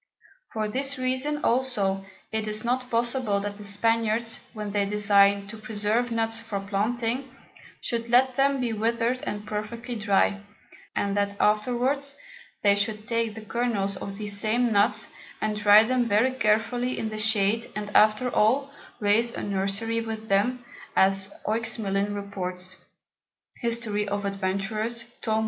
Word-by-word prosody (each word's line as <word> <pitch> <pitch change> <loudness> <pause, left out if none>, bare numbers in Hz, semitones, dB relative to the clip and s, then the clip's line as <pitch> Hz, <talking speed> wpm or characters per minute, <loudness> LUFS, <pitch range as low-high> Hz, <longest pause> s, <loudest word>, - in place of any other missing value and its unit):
For 215 -1 -1
this 270 +5 0
reason 260 +4 0
also 215 -6 +1 0.3
it 220 -1 -2
is 215 +1 0
not 250 +1 -1
possible 235 -3 +2
that 205 0 -4
the - - -8
Spaniards, 225 +2 +1
when 210 -2 -5
they 205 0 +1
design 200 -1 +3
to 225 - -8
preserve 215 +2 -1
Nuts 225 -1 -1
for 225 -3 -4
planting, 230 +6 -2 0.5
should 235 -1 -3
let 255 +1 +4
them 275 +1 +2
be 240 -3 -1
wither'd 230 +3 0
and 205 0 -4
perfectly 230 +4 -5
dry, 205 -2 +1 0.5
and 200 0 0
that 200 0 0
afterwards 250 +6 +1 0.5
they 200 -1 +6
should 210 +1 -1
take 230 -2 -1
the 220 -1 -9
Kernels 215 -4 -1
of 200 - -6
these 205 -1 0
same 230 +3 +2
Nuts, 205 +3 +2 0.3
and 215 0 -1
dry 210 +1 +7
them 250 +1 +1
very 230 +4 +3
carefully 240 +1 0
in 220 - -2
the 215 0 -5
Shade, 220 +1 +2
and 210 -1 -4
after 215 +3 +5
all, 260 +6 +2 0.3
raise 220 +3 +3
a - - -5
Nursery 200 +3 -1
with 220 -1 -6
them, 240 +5 +1 0.3
as 195 0 +4
Oexmelin 205 -2 0
reports, 185 -2 -4 0.8
History 230 -3 -1
of 200 0 -2
Adventurers, 200 +4 -2 0.2
Tom. 220 -1 0
220 Hz, 145 wpm, -26 LUFS, 205-235 Hz, 0.8 s, dry